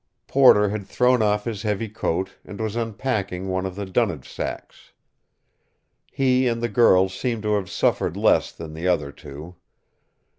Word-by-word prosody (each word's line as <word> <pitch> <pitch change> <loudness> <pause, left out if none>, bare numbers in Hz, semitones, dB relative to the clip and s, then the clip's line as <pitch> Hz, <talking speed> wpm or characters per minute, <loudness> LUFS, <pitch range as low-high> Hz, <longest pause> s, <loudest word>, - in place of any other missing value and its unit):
Porter 115 -7 +5
had 100 -1 -5
thrown 125 +1 +2
off 105 -1 +1
his 110 -4 -4
heavy 105 0 -2
coat, 95 -3 -2
and 100 - -10
was 110 -1 -3
unpacking 105 -5 -2
one 95 0 -1
of 95 - -8
the 100 0 -4
dunnage 95 - -1
sacks. - - -7 1.2
He 130 -1 +2
and 115 -1 0
the 120 0 -1
girl 95 -4 +5
seemed 115 +3 -3
to 105 0 0
have 100 -3 -1
suffered - - 0
less - - +3
than 80 -2 -9
the 80 +3 -4
other 75 -6 0
two. 75 +5 -11
105 Hz, 160 wpm, -23 LUFS, 95-115 Hz, 1.2 s, Porter